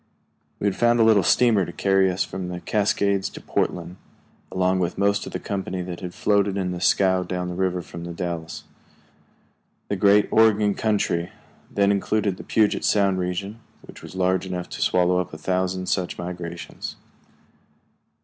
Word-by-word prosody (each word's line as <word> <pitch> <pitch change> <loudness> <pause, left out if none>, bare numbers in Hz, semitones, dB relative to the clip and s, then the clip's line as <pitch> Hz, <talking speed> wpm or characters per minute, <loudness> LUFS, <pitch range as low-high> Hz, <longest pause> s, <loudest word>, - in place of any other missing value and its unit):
We - - -3
had 100 -2 +1
found 120 0 +3
a - - +6
little 110 -3 +5
steamer 110 +1 +4
to 85 - -5
carry 95 +1 +2
us 90 0 0
from 95 -1 -6
the 90 0 -5
Cascades 100 -1 0
to - - -10
Portland, 90 +1 -2 0.5
along 95 0 +1
with 90 -1 -1
most 100 +1 +1
of - - -7
the - - -4
company 95 -2 -4
that 90 -1 -6
had 90 -1 -7
floated 100 -1 +1
in 90 -2 -1
the 90 -1 -5
scow 95 -1 +3
down 90 -1 -3
the - - -4
river 90 -1 -1
from 85 0 -9
The 85 - -6
Dalles. 85 -1 -5 1.3
The 100 - 0
great 100 +1 +4
Oregon 105 -2 +4
Country, 100 -6 0 0.4
then 100 0 +2
including 100 0 0
the 90 - -10
Puget 110 -2 +1
Sound 100 -2 +2
region, 100 +4 -3 0.4
was - - -11
large 95 0 +1
enough 90 -1 -4
to - - -7
swallow 90 0 +3
up 90 -4 -4
a - - -7
thousand 95 +2 -1
such 90 -1 -1
migrations. 85 -1 -6
95 Hz, 170 wpm, -23 LUFS, 90-100 Hz, 1.3 s, a